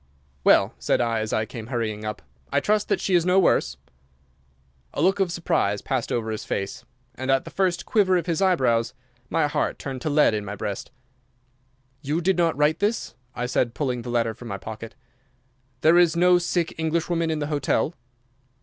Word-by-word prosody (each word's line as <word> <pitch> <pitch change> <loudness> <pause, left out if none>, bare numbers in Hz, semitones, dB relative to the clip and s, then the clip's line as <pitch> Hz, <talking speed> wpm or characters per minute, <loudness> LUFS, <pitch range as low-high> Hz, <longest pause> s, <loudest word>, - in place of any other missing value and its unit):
"Well," - - +5
said - - +1
I, 115 -2 +1
as 110 0 -3
I 110 - 0
came 115 -1 -8
hurrying 110 -4 -3
up, 105 -1 -5 0.3
"I - - +3
trust 210 0 0
that - - +2
she 190 - -1
is 175 -2 +4
no 180 +2 +3
worse?" 190 - +3 1.2
A - - -3
look 190 +6 +3
of 190 -3 +1
surprise 105 - 0
passed 130 -3 -2
over 110 -2 -1
his 110 - -4
face, 100 - -4 0.3
and 130 +2 -5
at 135 0 +2
the - - -9
first 185 -2 0
quiver 190 -4 +3
of 175 - -2
his 170 -1 -1
eyebrows 125 -10 +2 0.3
my - - +2
heart 145 - -1
turned 135 -2 -6
to 155 - -2
lead 150 -5 +4
in 105 -1 -2
my 105 0 -6
breast. 100 -1 -5 1.1
"You 150 +3 -1
did 185 +2 +2
not 165 -3 +2
write 150 +2 +2
this?" 210 +3 -1 0.2
I 125 - -2
said, 125 -1 0
pulling 125 -5 -1
the 120 - -7
letter 115 -2 0
from 120 +2 -11
my 100 -3 -4
pocket. 110 +2 -8 0.9
"There 165 +3 +6
is 175 -2 +4
no 180 +1 +5
sick 175 -1 -1
Englishwoman 165 +1 0
in 160 - 0
the 150 - -2
hotel?" 145 +3 0
145 Hz, 195 wpm, -24 LUFS, 115-175 Hz, 1.2 s, There